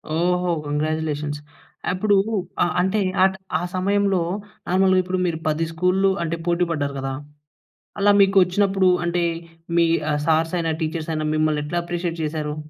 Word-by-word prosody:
ఓహో! 180 +1 +1 0.2
కంగ్రాచ్యులేషన్స్. 150 0 -2 0.5
అప్పుడు 200 +3 +2 0.5
అ - - +3 0.2
అంటే 190 +4 +1 0.2
ఆ - - +8
ట్ - - -10 0.4
సమయంలో 195 0 +1 0.5
నార్మల్‌గా 185 +1 +3
ఇప్పుడు 185 +1 -2
మీరు 165 -2 -1
10 155 +1 +1
స్కూల్‌ల్లు 180 +4 +2
అంటే 170 0 -2
పోటి 175 +1 +2
పడ్డారు 145 -3 -2
గదా? 135 0 -3 0.9
అలా 205 +1 +5
మీకు 195 0 +4
వచ్చినప్పుడు 195 +1 +2 0.2
అంటే 175 0 0 0.5
మీ 170 - +5 0.2
ఆహ్, 150 0 0
సార్స్ 160 +1 +2
అయినా 165 -1 0
టీచర్స్ 160 0 -3
అయినా 155 0 -2
మిమ్మల్ని 155 -1 +1
ఎట్లా 170 +4 -2
అప్రిషియేట్ 170 -1 -3
చేసారు? 150 -1 -3
170 Hz, 145 wpm, -22 LUFS, 155-185 Hz, 0.9 s, ఆ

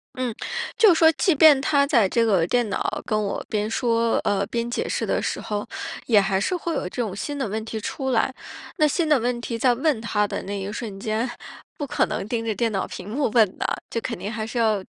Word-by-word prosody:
嗯， 255 -2 -2 0.4
就 430 -5 +7
说 320 0 +6
即 355 +4 +2
便 300 -1 +7
他 280 0 +2
在 235 -9 +4
这 230 +4 +2
个 195 -7 +3
电 240 +4 +1
脑 - - -2
跟 215 - 0
我 200 - -3
边 210 -1 -1
说， 230 0 +1
呃， 200 -1 +1
边 235 +3 -3
解 240 - -2
释 - - -2
的 - - +1
时 - - -3
候， 210 -1 -4 0.4
也 215 -4 +5
还 195 -1 +1
是 280 - 0
会 340 -2 -3
有 - - -1
这 185 +7 -4
种 210 -5 -3
新 290 +8 -4
的 275 -4 -2
问 215 +2 -3
题 225 -1 -4
出 265 +4 -3
来。 245 +2 +1 0.4
那 305 -3 +4
新 315 +2 0
的 300 -3 +5
问 240 +1 -1
题 235 -1 -4
在 245 +2 +3
问 270 0 +1
他 210 -2 0
的 - - -4
那 200 +1 -4
一 195 +1 -4
瞬 210 -3 -6
间， 220 +4 -1 0.5
不 290 - -4
可 - - +1
能 195 - -4
盯 230 0 -2
着 225 - 0
电 225 +3 0
脑 195 -2 -2
屏 185 +2 -8
幕 270 +6 0
问 215 -5 +3
的， - - -3 0.2
就 230 - -2
肯 230 -1 -4
定 205 - -4
还 225 -2 -3
是 230 +2 -3
要 215 -4 +2
230 Hz, 260 characters per minute, -24 LUFS, 210-265 Hz, 0.5 s, 就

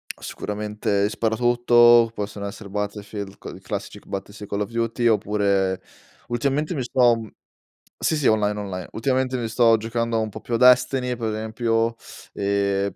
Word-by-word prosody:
Ah, - - -24
sicuramente 105 -1 -2
i 105 - 0
sparatutto, 120 +1 +4
possono 100 -1 -5
essere 100 0 -9
Battlefield 100 0 -5
c - - -9
i - - -12
classici - - -6
c - - -26
Battle 100 +1 -6
sì 105 0 -9
Call 100 +1 -3
of 105 - -2
Duty 115 +1 -1
oppure 100 -3 +1 0.5
ultimamente 140 +7 -1
mi 135 - -2
sto 120 -1 +3 0.8
Sì, 160 - +1
sì 145 - -2
online, 105 -1 +2
online, 95 -3 -5
ultimamente 130 +1 0
mi 115 - -2
sto 115 0 +4
giocando 115 +1 -1
un 110 -1 -1
po' 110 - -8
più 120 - -2
a - - +2
Destiny 125 0 +4
per 115 -2 -3
esempio 115 +1 -1 0.4
e 100 0 0
110 Hz, 165 wpm, -23 LUFS, 100-120 Hz, 0.8 s, sparatutto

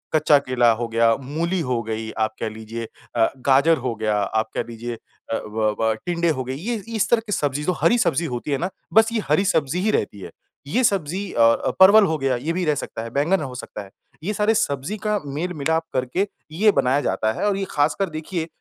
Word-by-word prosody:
कच्चा 155 -1 +5
केला 125 -3 +2
हो 115 +1 -2
गया, 115 0 +3
मूली 165 +7 -2
हो 125 -5 -1
गई 110 0 -4
आप 110 0 0
कह - - -2
लीजिए 110 +1 -7 0.3
अ, 115 -1 +3
गाजर 140 +5 +4
हो 125 -3 -3
गया 110 -1 0
आप 110 +2 -1
कह - - 0
लीजिए 120 +1 -5
अ, 115 0 -7
व 105 0 0
व 110 0 +2
टिंडे 170 -1 0
हो 130 -5 -1
गई। 130 +1 -4
ये 215 - -3
ये 225 +2 -7
इस 215 0 +1
तरह 235 -1 +4
की - - -5
सब्ज़ी 145 -5 -1
जो 180 - +1
हरी 240 - +4
सब्ज़ी 170 - +1
होती 120 +4 -5
है 140 - +2
ना? 175 +6 -2 0.2
बस 220 +1 +5
ये 225 - 0
हरी 195 - +3
सब्ज़ी 160 -3 +1
ही 215 +3 +2
रहती 105 - -1
है। - - -8 0.4
ये 245 - +1
सब्ज़ी 195 -2 0
अ, 115 - +1
अ, 115 0 +4
परवल 200 +3 +8
हो 160 -4 0
गया 135 -2 0
ये 150 +7 -2
भी 180 +1 -1
रह 150 -2 +2
सकता 115 - -5
है। 115 - -6
बैंगन 155 +7 +1
हो 130 -4 -6
सकता 115 -3 -7
है, 95 - -15 0.3
ये 205 +5 -1
सारे 210 +2 +2
सब्ज़ी 170 -1 -1
का 210 -1 +1
मेल-मिलाप 160 +2 -1
करके 130 +10 0 0.2
ये 205 +7 +4
बनाया 135 +2 +2
जाता 110 -6 0
है - - -2
और 200 -1 +1
ये 195 - -2
ख़ासकर 155 +6 +1
देखिए 160 +1 -4
145 Hz, 230 wpm, -22 LUFS, 120-185 Hz, 0.4 s, परवल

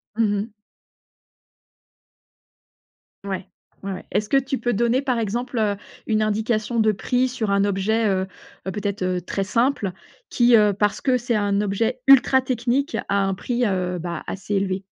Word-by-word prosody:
Mmh 215 -2 +2
mh. 220 0 -8 2.7
Ouais, 190 -1 -4 0.4
ouais, 195 -1 -3
ouais. - - -8
Est-ce 210 - 0
que 275 - +1
tu 270 0 +1
peux 245 - -1
donner 235 +5 +2
par 255 -4 0
exemple, 235 +3 -2
heu, 210 -2 +1 0.3
une 215 -1 +1
indication 215 +2 0
de 215 -1 +4
prix 250 +5 0
sur 220 -5 -2
un 200 0 +3
objet, 205 +3 +1
heu, 190 0 0 0.4
peut-être, 200 +1 -3
heu, 180 -1 0
très 195 +2 -3
simple, 230 -3 +1 0.4
qui 240 -1 +4
,heu, 210 -1 +4
parce 210 +1 0
que 255 -2 +2
c'est 240 -1 -1
un 205 -1 +1
objet 225 +5 -1
ultra 265 -1 +6
technique 255 +4 -1
à 200 0 +1
un 195 - 0
prix, 240 +5 -1
heu, 180 -2 -1
bah, 170 -1 -5
assez 200 +1 -4
élevé? 195 -1 0
215 Hz, 165 wpm, -22 LUFS, 195-240 Hz, 2.7 s, ultra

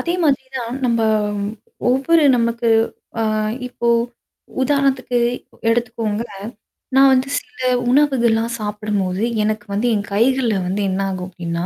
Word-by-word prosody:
அதே 345 +1 -1
மாதிரி 270 -3 +2
தான் 235 0 -4
நம்ப 230 -2 +1 0.9
ஒவ்வொரு 290 +5 +3
நமக்கு 235 0 0 0.5
அ - - +2 0.5
இப்போ 235 -1 -2 0.7
உதாரணத்துக்கு 270 -3 +1 0.5
எடுத்துக்கோங்க. 230 -2 -1 0.7
நான் 270 0 +7
வந்து 260 +1 +1
சில 435 - -22 0.3
உணவுகள்லாம் 235 -5 +2
சாப்பிடும்போது, 210 -2 -2 0.2
எனக்கு 215 0 -1
வந்து 220 +5 0
என் 205 0 -3
கைகள்ல 240 0 +2
வந்து 200 +3 -1
என்ன 190 +1 -1
ஆகும் 185 -1 -5
அப்டின்னா, 170 -1 -4
235 Hz, 120 wpm, -19 LUFS, 210-260 Hz, 0.9 s, நான்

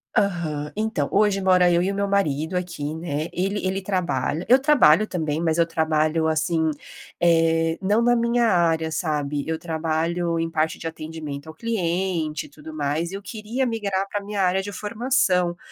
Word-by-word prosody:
Aham. 170 -8 0
Então, 215 -9 -1
hoje 200 -1 +2
mora 180 -1 +4
eu 170 0 +3
e 190 +2 0
o - - -4
meu 200 0 0
marido 160 -4 0
aqui, 170 -5 -3
né. 160 -1 -3
Ele 195 +2 -1
ele 190 +1 -1
trabalha 175 -5 -1
eu 255 +2 +6
trabalho 215 - +5
também, 160 -4 -2
mas 165 -1 +1
eu 170 - +4
trabalho 160 -1 +1
assim, 160 +1 +1 0.5
eh, 165 -1 +2
não 205 +3 +2
na 240 0 +4
minha 235 0 +2
área, 165 -5 +2
sabe. 150 -3 -1
Eu 160 0 -1
trabalho 165 +1 -1
em 165 0 -2
parte 160 0 0
de - - -10
atendimento 155 -2 -6
ao 160 - -9
cliente 175 -6 -1
e - - -14
tudo 155 +1 -11
mais, 150 +3 -1
e - - -5
eu 200 - -7
queria 225 +5 -3
migrar 200 -5 -1
pra 205 0 -4
minha 205 0 -3
área 185 +1 +2
de 205 +1 -6
formação. 205 -4 +1
170 Hz, 180 wpm, -23 LUFS, 160-200 Hz, 0.5 s, eu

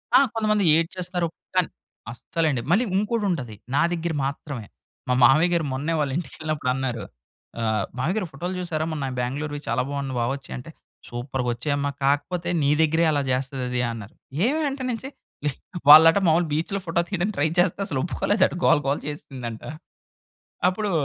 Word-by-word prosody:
ఆ! - - +9
కొంతమంది 215 -2 +1
ఏడ్చేస్తారు. 175 +1 -1 0.3
కానీ, - - +3 0.4
అస్సలండి 145 +1 -1
మళ్ళీ 230 +6 +4
ఇంకోటి 215 +1 0
ఉంటది. 125 -11 -3 0.2
నా - - +4
దగ్గర 170 -1 -2
మాత్రమే 135 -4 -5 0.4
మా - - +4
మామయ్య‌గారు 160 +5 +5
మొన్నే 150 +5 -1
వాళ్ళ 140 -3 0
ఇంటికెళ్ళినప్పుడు 155 -3 -3
అన్నారు. 125 -5 -2 0.6
ఆహ్, 110 -3 +1
మావయ్య‌గారు 180 +8 0
ఫోటోలు 175 +7 -4
చూసారా? 160 -3 -2
మొన్న 145 -3 -3
బెంగుళూరు‌వి 145 +4 -3
చాలా 115 - +1
బావున్నాయి 140 -3 -3
బా 120 - +1
వచ్చాయి 140 0 -7
అంటే, 125 +6 -9 0.4
సూపర్‌గా 125 +1 -3
వచ్చాయమ్మా 140 +3 -1
కాకపోతే, 165 +5 0
నీ 140 +1 +3
దగ్గరే 160 +1 +3
అలా 145 -1 +1
చేస్తది 130 0 -2
అది 125 0 0
అన్నారు. 110 -2 -9 0.3
ఏమి 310 +4 +1
అంటే 270 -1 -5
నుంచి 250 +4 -5 0.8
వాళ్ళట 165 +4 +10
మామూలుగా 165 0 +3
బీచ్‌లో 170 +6 -1
ఫోటో 170 0 +1
తీయడానికి 190 +2 -1
ట్రై 145 - +3
చేస్తే 180 +2 +2
అసలు 145 -7 -2
ఒప్పుకోలేదంట. 185 +3 +1
గోల - - +5
గోల 140 - +2
చేసిందంట. 125 -6 -6 1.1
అప్పుడు 205 +2 -1
150 Hz, 150 wpm, -24 LUFS, 135-175 Hz, 1.1 s, వాళ్ళట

